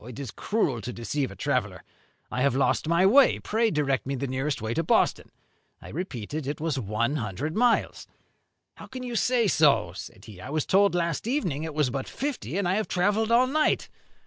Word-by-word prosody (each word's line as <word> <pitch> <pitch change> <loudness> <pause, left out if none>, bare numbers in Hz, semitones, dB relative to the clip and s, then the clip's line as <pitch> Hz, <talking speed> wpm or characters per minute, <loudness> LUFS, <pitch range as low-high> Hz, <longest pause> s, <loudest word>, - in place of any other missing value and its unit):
It 120 0 -10
is 135 -6 -6
cruel 140 - -1
to 120 - -5
deceive 130 +4 -3
a - - -10
traveller. - - -2 0.5
I 125 - -2
have 140 -1 +2
lost 135 +3 +1
my 170 +3 +3
way. 260 +7 +6
Pray 225 +1 0
direct 140 -7 0
me 135 - -1
the 135 - -3
nearest 135 +2 -2
way 110 +1 -3
to 165 - 0
Boston.' 165 - +1 0.5
I - - -12
repeated 145 - -5
it 145 - -3
was 155 -3 -1
one 115 +6 -1
hundred 130 - -4
miles. 240 0 +1 0.7
'How - - -11
can 255 -1 -7
you 245 -1 -5
say 240 -1 +2
so?' 140 - +3
said 95 +2 -10
he. 100 -5 -12
'I 130 - -8
was 155 0 -1
told 200 -1 +3
last 170 +3 -1
evening 180 - -1
it 160 -2 -5
was 150 -5 +1
but 135 0 -4
fifty, 280 -8 -4
and 200 -3 0
I 185 +3 +1
have 215 - -1
travelled 205 +5 +1
all 240 +2 +5
night.' 305 +4 +1
150 Hz, 205 wpm, -26 LUFS, 130-205 Hz, 0.7 s, way